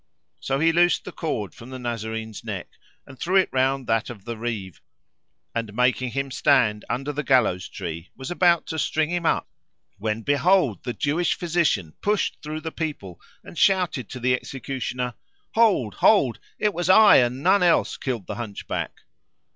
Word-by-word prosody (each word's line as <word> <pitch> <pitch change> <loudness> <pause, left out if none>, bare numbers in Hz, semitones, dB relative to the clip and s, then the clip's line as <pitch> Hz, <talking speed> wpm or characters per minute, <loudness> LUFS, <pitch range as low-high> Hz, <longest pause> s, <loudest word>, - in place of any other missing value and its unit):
So 135 - -1
he 165 +2 +4
loosed 175 +1 +3
the - - -6
cord 110 - -3
from 115 - -12
the 130 - -7
Nazarene's 110 -2 -5
neck - - -5 0.4
and 135 - -14
threw 185 +3 -1
it 190 -1 +4
round 130 0 +1
that 115 -1 0
of 105 -5 -10
the 115 - -4
Reeve 110 -6 -5 0.7
and, 115 -3 -4
making 125 +1 +2
him 135 0 -2
stand 120 -7 +2
under 135 +4 -2
the 150 - -2
gallows 120 -10 +2
tree, 85 0 -6
was 135 +5 -7
about 175 -2 +3
to 160 - -4
string 155 +1 0
him 175 -2 0
up - - +1 0.5
when 110 +2 -2
behold, 145 - +2
the 120 - -2
Jewish 160 +7 0
physician 165 - 0
pushed 210 0 0
through 155 +1 -5
the 160 0 -5
people 145 - -5 0.2
and - - -9
shouted 180 - +2
to 125 - -7
the 125 +1 +2
executioner, 125 -1 -4 0.4
"Hold! 200 - +3
Hold! 140 - +3 0.2
It 210 -1 +1
was 175 +1 -2
I 210 +2 +8
and 125 +2 +1
none 200 - +4
else 175 -2 +3
killed 120 - -4
the 105 - -6
Hunchback! 105 -4 -5
130 Hz, 170 wpm, -24 LUFS, 115-165 Hz, 0.7 s, I